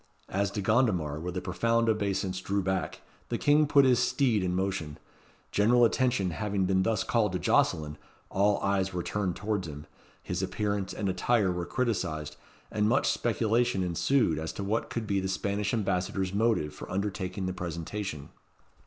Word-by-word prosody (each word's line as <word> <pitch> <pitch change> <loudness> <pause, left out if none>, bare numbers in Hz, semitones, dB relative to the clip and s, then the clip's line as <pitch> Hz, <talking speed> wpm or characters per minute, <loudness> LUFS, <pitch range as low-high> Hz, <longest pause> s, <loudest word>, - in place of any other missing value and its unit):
As 100 +1 0
De 100 +1 -3
Gondomar 95 - +1
with 90 +3 -4
a - - -1
profound 115 +5 +1
obeisance 95 -3 0
drew 100 +1 -1
back, 95 0 -2 0.3
the - - -1
King 150 +1 +4
put 140 -1 +5
his 125 -2 +4
steed 125 -3 +2
in 90 -1 0
motion. 95 -6 -2 0.5
General 120 +4 +4
attention 115 -6 +1
having 100 +1 -1
been 95 0 +2
thus 110 0 +1
called 105 -5 +1
to - - +1
Jocelyn, 75 -4 +1 0.3
all 100 +1 +3
eyes 95 -1 0
were 90 -1 -2
turned 100 -2 -2
towards 100 -4 -2
him, 75 -1 -8 0.4
his 90 0 -3
appearance 100 0 -2
and 105 - -3
attire 95 +2 +2
were 90 -1 -3
criticised, 85 - -2 0.4
and 105 0 +1
much 135 - +3
speculation 115 -3 +1
ensued 90 - +1
as 80 0 -3
to 100 - -5
what 105 +4 -1
could 115 -2 -3
be 100 -2 0
the 95 - -2
Spanish 100 +1 -1
Ambassador's 95 -3 -1
motive 105 -8 +1
for - - -9
undertaking 95 0 -3
the 95 - -2
presentation. 85 -2 -5
100 Hz, 170 wpm, -29 LUFS, 90-110 Hz, 0.5 s, put